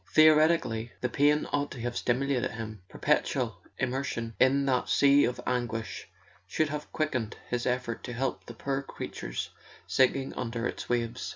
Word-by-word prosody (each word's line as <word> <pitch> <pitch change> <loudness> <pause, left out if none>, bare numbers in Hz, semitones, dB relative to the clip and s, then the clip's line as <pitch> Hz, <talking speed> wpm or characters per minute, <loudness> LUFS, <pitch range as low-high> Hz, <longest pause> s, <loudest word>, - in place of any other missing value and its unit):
Theoretically, 155 -7 +5
the 125 - 0
pain 145 +4 +3
ought 145 0 +1
to 120 - -7
have 120 0 -3
stimulated 130 0 +1
him: 110 -2 -7
perpetual - - 0 0.2
im¬ 130 - +1
mersion 125 -3 -3
in 140 +2 +4
that 130 -2 +1
sea 140 0 +5
of 125 - -2
anguish 120 -3 -2 0.4
should 155 - +1
have 150 0 -5
quickened 130 -8 -1
his 125 0 -1
effort 125 -2 -1
to 120 - -5
help 130 +2 -2
the 120 - -8
poor 135 +3 -2
creatures 140 - -5 0.3
sinking 135 +1 +2
under 115 -1 -3
its - - -4
waves. 120 0 -1
125 Hz, 160 wpm, -29 LUFS, 120-140 Hz, 0.4 s, Theoretically